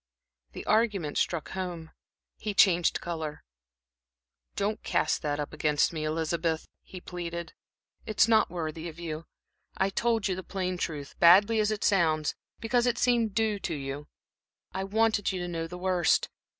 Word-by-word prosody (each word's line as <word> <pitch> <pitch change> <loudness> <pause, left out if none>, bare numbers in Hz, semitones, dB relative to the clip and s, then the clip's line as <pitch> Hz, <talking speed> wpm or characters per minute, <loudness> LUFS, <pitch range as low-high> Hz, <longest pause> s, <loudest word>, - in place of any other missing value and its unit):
The - - -7
argument 210 -8 +1
struck 170 -3 -1
home. 175 -4 -5 0.5
He 210 -1 -3
changed 175 -3 +4
color. 160 -3 -5 1.1
"Don't 205 +2 -1
cast 155 - 0
that 145 -1 -1
up 145 - -4
against 150 +1 +2
me, 155 -1 -3
Elizabeth," 160 +1 -1
he 185 - -10
pleaded. 170 -1 -6 0.5
"It's 215 0 +4
not 220 -1 +4
worthy 165 -1 -4
of 160 - -12
you. 165 -1 -6 0.5
I 195 +1 +1
told 225 0 +1
you 190 - 0
the 185 - -5
plain 185 -1 -3
truth, 145 -5 -4
badly 200 +6 +7
as 210 0 +2
it 215 -1 -2
sounds, 160 -6 +2 0.3
because 240 +2 +1
it 245 - +1
seemed 235 -4 +2
due 220 -2 +1
to 170 -4 -3
you 140 +1 -5 0.6
I 190 0 -3
wanted 220 0 +2
you 185 - -3
to 175 - -3
know 165 -1 -3
the 180 +2 -8
worst. 180 -2 +2
175 Hz, 160 wpm, -28 LUFS, 160-205 Hz, 1.1 s, badly